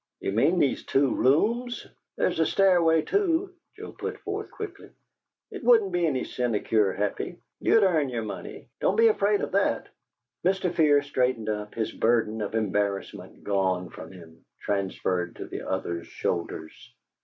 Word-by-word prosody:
"You - - -2
mean 140 - +3
these 140 -6 +1
two 135 -1 +2
rooms?" 230 - +1 0.3
"There's - - 0
a 160 - +4
stairway, 170 -5 +4
too," 375 - 0 0.2
Joe - - -8
put - - -5
forth, 415 0 -4
quickly. - - -8 0.6
"It 405 - -8
wouldn't 230 -5 +5
be 175 -1 +1
any 135 -4 0
sinecure, 110 -4 0
Happy. 100 +2 -3 0.2
You'd 225 - +4
earn 160 -7 +2
your 120 -3 -3
money; 100 -3 -7
don't 190 - +2
be 225 +1 +6
afraid 205 -1 +2
of - - -3
that!" 200 +1 +1 0.5
Mr. 185 -1 +1
Fear 150 -4 +4
straightened 125 -5 0
up, 105 -1 -4
his 115 -1 -2
burden 110 -2 +1
of 105 +1 -3
embarrassment 100 -2 -2
gone 95 -3 0
from - - -10
him, 85 -3 -15 0.2
transferred 95 -3 -2
to - - -7
the - - -7
other's 85 -3 -3
shoulders. 85 -2 -3
130 Hz, 155 wpm, -26 LUFS, -, 0.6 s, be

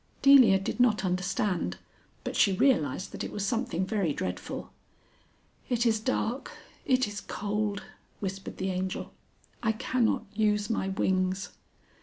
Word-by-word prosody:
Delia 260 -8 +8
did 195 +5 -4
not 225 -5 +3
understand, 180 - -1 0.5
but - - -4
she 195 - +4
realised 185 - +2
that - - -5
it - - -5
was 205 -1 -2
something 230 -6 -1
very 195 -7 0
dreadful. 90 -6 -5 1.0
"It 245 -1 +1
is 220 -2 +3
dark, 245 +2 -1 0.4
it 255 -3 +3
is 205 0 -6
cold," 205 0 -2 0.4
whispered 195 -1 -5
the 190 0 -1
Angel; 185 +1 -3 0.5
"I 220 -1 +2
cannot 230 -1 0
use 210 0 +1
my 195 - 0
wings." 190 0 0
205 Hz, 135 wpm, -29 LUFS, 190-230 Hz, 1.0 s, Delia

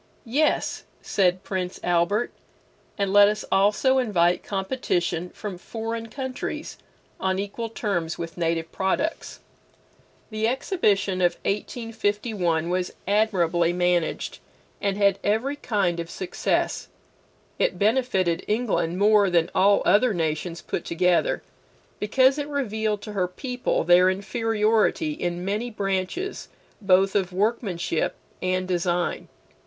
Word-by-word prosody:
Yes, 285 +7 0 0.2
said 185 -1 +1
Prince 185 -2 -3
Albert, 175 +6 +1 0.7
and 200 -2 0
let 205 0 +8
us 210 +1 -1
also 210 +7 +3
invite 180 -8 +2
competition 185 -4 -2
from 195 -3 -7
foreign 225 +2 -5
countries 260 +2 -5 0.4
on 190 0 0
equal 205 +4 -4
terms 195 -7 -2
with 165 -1 -6
native 165 -1 -1
products. 195 +12 -2 0.9
The 215 +1 0
Exhibition 205 - +1
of 175 -1 +3
1851 205 -5 -1
was 180 0 -1
admirably 180 -5 +2
managed, 175 -2 0 0.4
and 200 -1 0
had 200 -1 +3
every 225 +7 +1
kind 195 -10 0
of 170 0 -5
success. 185 +1 -1 0.7
It - - +1
benefited 200 -6 +1
England 210 -6 0
more 205 0 +5
than 170 -2 +2
all 200 +2 +4
other 205 +4 +4
nations 165 +1 -2
put - - -3
together, 175 +1 +1 0.6
because 260 +6 +3
it 290 - -3
revealed 220 -7 -2
to 210 - -7
her 185 -3 0
people 250 +6 -2
their 175 +2 +6
inferiority 220 - +1
in 175 -8 -3
many 210 +5 -1
branches 200 - -3 0.3
both 195 0 +4
of 190 -3 0
workmanship 190 -4 -1 0.3
and 185 0 0
design. 175 -1 -1
200 Hz, 115 wpm, -25 LUFS, 180-220 Hz, 0.9 s, let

